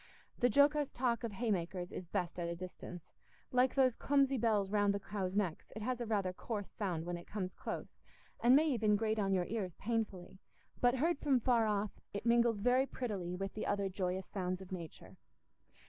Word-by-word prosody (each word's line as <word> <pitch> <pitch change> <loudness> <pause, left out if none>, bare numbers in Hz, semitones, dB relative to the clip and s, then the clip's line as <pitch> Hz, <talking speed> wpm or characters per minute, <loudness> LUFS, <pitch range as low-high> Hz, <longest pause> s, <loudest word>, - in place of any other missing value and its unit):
The 245 - +4
jocose 285 +3 +4
talk 240 -2 0
of 230 -3 -3
hay 225 +2 -1
makers 175 -1 -2
is 180 - -6
best 175 +1 -2
at 170 - -1
a 170 - -3
distance; 180 -1 -9 0.4
like 250 0 +3
those 260 -3 +4
clumsy 275 -2 +2
bells 210 -4 +2
round 205 -1 +3
the - - -1
cows' 190 0 -3
necks, 190 -6 -1
it 220 - -5
has 250 +1 -1
rather 210 -5 0
a - - -14
coarse 205 +1 -5
sound 175 -6 -2
when 175 0 -3
it 170 - -11
comes 185 -3 -4
close, - - -6 0.4
and 245 +2 +6
may 310 +3 +5
even 220 -6 +3
grate 220 +1 0
on 195 -1 +1
your 185 -2 +2
ears 195 -5 -3
painfully; 205 -5 -3 0.4
but 245 +1 +4
heard 320 +4 +1
from 275 -4 +3
far 235 -2 +3
off, 210 -1 -1
it 200 - -4
mingles 235 -1 +4
very 250 +5 +3
prettily 195 -10 -3
with 195 +1 -4
the 215 - -3
other 200 -1 0
joyous 185 0 -2
sounds 185 -2 -3
of 190 -1 -11
nature. 170 -4 -8
210 Hz, 200 wpm, -35 LUFS, 185-240 Hz, 0.4 s, and